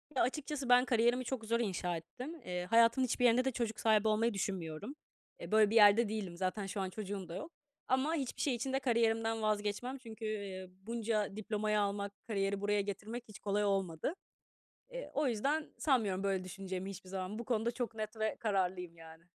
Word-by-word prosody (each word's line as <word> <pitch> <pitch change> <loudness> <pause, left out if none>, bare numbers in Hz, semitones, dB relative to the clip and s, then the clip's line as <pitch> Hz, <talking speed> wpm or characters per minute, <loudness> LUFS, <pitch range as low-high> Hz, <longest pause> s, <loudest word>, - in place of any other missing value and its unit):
Ya, - - +3
açıkçası, 275 0 -2
ben 250 +1 +7
kariyerimi 240 +1 +2
çok 235 -3 -3
zor 230 +2 +1
inşa 180 -5 -1
ettim. 255 - -8
Eee, 180 0 -3
hayatımın 230 +5 +5
hiçbir 245 +1 +1
yerinde 245 +2 +5
de 265 - +2
çocuk 230 -2 -2
sahibi 220 -1 +4
olmayı 220 +1 +2
düşünmüyorum. 190 - -3 0.4
Eee, - - -8
böyle 215 -1 +6
bir 225 - -1
yerde 210 0 +7
değilim, 195 -6 -4
zaten 190 +2 -1
şu 195 +1 -3
an 190 - -2
çocuğum 195 -1 -5
da 170 - -5
yok 210 - -6 0.4
ama 265 +5 +2
hiçbir 270 -5 -3
şey 270 -4 +2
için 260 +3 -3
de 270 - +2
kariyerimden 225 -3 +2
vazgeçmem. 215 +5 -1
Çünkü, 225 -3 -8
eee, 200 -3 -4 0.2
bunca 220 -3 -1
diplomayı 215 0 0
almak, 200 0 -1
kariyeri 200 -2 0
buraya 205 0 +2
getirmek 210 +4 -5
hiç 210 -6 -11
kolay 205 0 0
olmadı. 195 - 0 0.8
Eee, - - -6
o 295 - +2
yüzden 275 +7 0
sanmıyorum 210 -10 +1
böyle 190 -2 0
düşüneceğimi 190 0 -5
hiçbir 185 -1 -9
zaman. 190 +3 -4
Bu 235 - -5
konuda 235 -1 +1
çok 240 -2 -4
net 215 0 -4
ve 220 0 0
kararlıyım, 180 -5 -1
yani. 160 0 -13
215 Hz, 190 wpm, -34 LUFS, 195-235 Hz, 0.8 s, ben